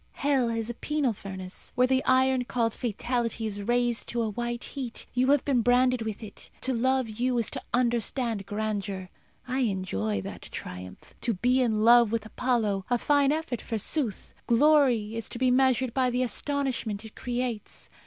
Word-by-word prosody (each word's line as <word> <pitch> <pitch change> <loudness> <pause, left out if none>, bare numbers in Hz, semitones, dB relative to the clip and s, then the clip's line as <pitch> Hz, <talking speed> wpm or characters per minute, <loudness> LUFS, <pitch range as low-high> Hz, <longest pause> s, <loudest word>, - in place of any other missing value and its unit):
Hell 270 -4 +1
is 230 -1 -2
a 240 - -3
penal 285 0 -1
furnace, 190 -2 -7
where 250 - +4
the 260 +1 +2
iron 260 0 +3
called 230 -2 0
Fatality 235 0 -2
is 205 -1 -3
raised 240 +2 +1
to 235 -1 0
a 220 - -2
white 240 +2 -3
heat. 255 -5 -6
You 255 +1 +2
have 285 -1 +3
been 265 -4 +2
branded 250 +1 +3
with 220 0 -4
it. 215 - -10
To 260 - +1
love 260 +1 +1
you 240 +3 -1
is 230 - 0
to - - -4
understand 235 -3 0
grandeur. 205 -3 -3 0.4
I 255 +2 -1
enjoy 185 - -1
that - - -8
triumph. 90 +1 -8
To 230 -4 0
be 250 +7 +2
in 220 -4 +1
love 235 0 +6
with 225 -1 -1
Apollo 215 -4 0
a 245 - +3
fine 285 +2 +3
effort, 300 -7 -2
forsooth! 225 +1 -2
Glory 245 -4 +4
is 230 - -3
to - - -3
be 255 0 +2
measured 260 -1 +3
by 260 -1 +2
the 250 +1 0
astonishment 250 -4 -2
it 220 - -11
creates. 245 -3 -4
240 Hz, 175 wpm, -27 LUFS, 215-255 Hz, 0.4 s, love